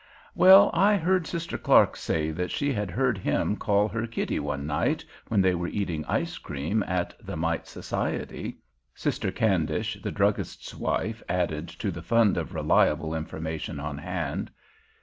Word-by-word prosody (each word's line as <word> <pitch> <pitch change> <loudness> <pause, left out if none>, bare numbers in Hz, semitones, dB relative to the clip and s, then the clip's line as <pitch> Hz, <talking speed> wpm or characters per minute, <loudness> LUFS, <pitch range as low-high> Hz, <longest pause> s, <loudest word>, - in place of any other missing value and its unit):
"Well, 190 +2 +8
I 205 +3 +4
heard 180 -1 +1
Sister 170 -1 -4
Clark - - +5
say 80 0 -1
that 90 +3 -3
she 145 -1 0
had 105 -4 -2
heard 125 +2 0
him 105 - 0
call 105 0 +2
her 115 +2 -2
'Kitty' 115 - -2
one 70 0 -3
night 75 0 0 0.2
when 105 -3 +2
they 95 -1 +3
were 85 0 -2
eating 85 -7 -2
ice - - -1
cream 75 +10 -2
at 90 -1 -1
the 100 -4 -5
Mite 80 0 -1
Society," - - -4 0.4
Sister - - -1
Candish, - - 0
the - - -3
druggist's - - -1
wife, 110 0 -2
added 85 -3 -1
to - - -4
the - - -7
fund 115 -2 +3
of 85 +1 -4
reliable 75 +1 +2
information 80 -1 -4
on 75 0 -4
hand. 85 -3 -3
90 Hz, 160 wpm, -27 LUFS, 80-115 Hz, 0.4 s, Well